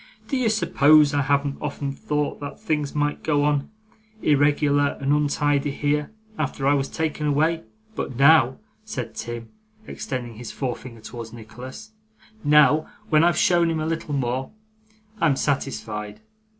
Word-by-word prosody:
Do - - 0
you 255 -4 +2
suppose 155 -8 +4
I 145 - +2
haven't 140 0 0
often 140 -1 -3
thought 150 +1 -2
that 145 -1 -7
things 150 -2 -2
might 145 0 0
go 145 -2 +1
on 145 -1 +1 0.5
irregular 145 -1 +3
and 140 +1 +1
untidy 145 -1 +1
here, 145 +1 -1 0.3
after 135 - -2
I 140 - +5
was 140 -1 0
taken 155 -1 -2
away? 155 +1 +1 0.3
But 130 - -4
now,' 135 -1 +5 0.3
said - - -5
Tim, 120 -1 -6 0.4
extending 120 -4 -5
his 120 0 -7
forefinger 125 -3 -5
towards 115 0 -8
Nicholas, 125 - -10 0.5
'now, 150 0 +5 0.2
when 155 0 +5
I've 175 0 +3
shown 170 -2 +3
him 165 -1 -1
a 155 - -2
little 160 -2 -2
more, 130 0 -1 0.7
I'm 155 -6 +3
satisfied. 110 -7 -3
145 Hz, 145 wpm, -24 LUFS, 130-150 Hz, 0.7 s, I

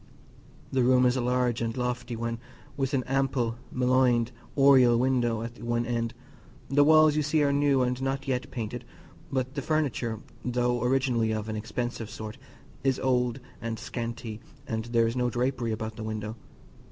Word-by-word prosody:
The 130 - +2
room 125 +1 +5
is 125 0 +3
a 130 - 0
large 125 -1 +1
and 115 +1 -2
lofty 125 -1 -2
one, 115 0 -3 0.4
with 135 -1 0
an 130 - +1
ample 130 -3 0
mullioned 125 -2 +3 0.3
oriel 130 -4 +6
window 120 -3 +1
at 115 +1 -8
one 120 0 0
end; 115 -1 -2 0.5
the 145 +2 +5
walls, 155 0 +6
you 155 - +2
see, 150 +1 +2
are 140 -1 +2
new, 140 -2 +3
and 125 +1 -1
not 135 +1 -2
yet 130 -1 -1
painted; 115 0 -5 0.5
but 130 -1 -1
the 140 - -3
furniture, 130 -7 -1 0.2
though 120 -1 0
originally 125 -3 +2
of 110 0 -3
an 110 - -2
expensive 110 +1 -4
sort, 110 0 -7 0.4
is 135 -1 +2
old 125 -1 +1 0.2
and 115 0 -3
scanty, 115 -1 -5 0.3
and 110 -4 -3
there 115 -1 +2
is 115 +1 -1
no 125 -1 +1
drapery 120 -1 -1
about 110 0 -4
the 110 - -5
window. 110 0 -4
125 Hz, 170 wpm, -28 LUFS, 115-130 Hz, 0.5 s, oriel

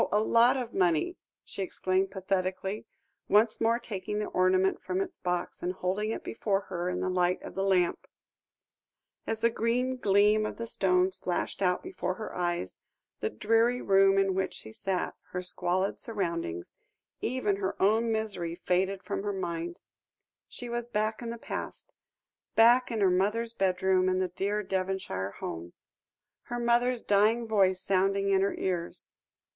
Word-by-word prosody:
a 210 - +4
lot 230 +4 +4
of 245 -3 -4
money," 180 - +2 0.3
she - - -6
exclaimed 190 0 0
pathetically, 190 +1 -2 0.4
once 215 +2 +4
more 230 +1 +3
taking 210 -3 -5
the 210 - -1
ornament 185 +1 +2
from 185 0 -2
its 195 - -3
box, 180 -1 -3
and 180 +1 -1
holding 190 +4 -1
it 225 - -3
before 200 -3 -1
her 180 -1 -2
in 180 - -2
the - - -1
light 180 -1 +1
of - - -8
the 195 - -1
lamp. 185 -3 +1 1.2
As 225 0 -2
the 230 0 +3
green 250 +3 0
gleam 210 -1 +4
of 215 - -4
the 230 - -4
stones 185 -3 +2
flashed 180 +2 -3
out 180 -1 +1
before 365 - -3
her 215 +2 -7
eyes, 175 - -2 0.4
the 110 - -1
dreary 230 - +2
room 195 -1 +4
in 195 -1 +3
which 190 0 -1
she 110 - -9
sat, 185 +8 -2 0.2
her 180 0 -2
squalid 185 +1 -1
surroundings, 170 - -3 0.5
even 225 -5 0
her 195 -1 -3
own 220 +4 +3
misery 200 -7 -2
faded 190 +2 0
from 200 - -3
her 205 0 -2
mind; 170 -2 -4 0.7
she 245 - -8
was 240 0 -3
back 215 0 -1
in 235 - -4
the 235 - -5
past - - -6 0.6
back 240 +3 +6
in 225 -3 -2
her 190 -2 +5
mother's 210 +5 +1
bedroom 185 -1 +2
in 185 - +1
the 185 -1 0
dear 200 +4 -1
Devonshire 185 - -2
home 85 +1 -6 0.7
her 240 - -4
mother's 240 +1 +2
dying 215 +4 +3
voice 195 -4 +3
sounding 195 +1 +1
in 195 -1 +3
her 200 - +1
ears. 175 -2 -3
195 Hz, 160 wpm, -29 LUFS, 185-220 Hz, 1.2 s, back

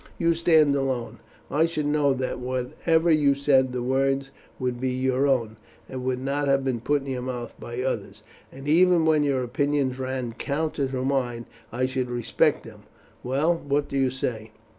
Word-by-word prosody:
You 170 -1 +2
stand 160 -3 +4
alone, 130 -4 -2 0.3
and 145 - -3
I - - +6
should 155 -3 -3
know 145 -1 +2
that 130 -1 -3
whatever 130 +7 0
you 145 -3 +4
said 135 -2 +3
the 125 -1 -3
words 135 +1 0 0.3
would 125 -1 -3
be 130 - 0
your 130 +2 +1
own, 115 -5 0 0.3
and 130 -1 -6
would 130 0 0
not 140 +2 -1
have 135 0 +2
been 130 -3 0
put 145 +3 0
in - - -10
your 125 -1 -3
mouth 125 -1 -5
by 120 +2 -5
others, 105 -5 -4 0.3
and 135 +2 -10
even 170 +1 +4
when 155 -1 +4
your 140 -3 +1
opinions 135 +1 0
ran 130 -2 -3
counter 145 +2 -2
to 130 -1 -3
mine 125 -4 -1 0.3
I 130 +2 0
should 130 -1 -2
respect 120 -1 +1
them. - - -13 0.4
Well, 140 +7 +1
what 145 -2 -1
do - - -5
you 135 -1 +2
say?" 115 -4 -4
135 Hz, 185 wpm, -25 LUFS, 125-145 Hz, 0.4 s, I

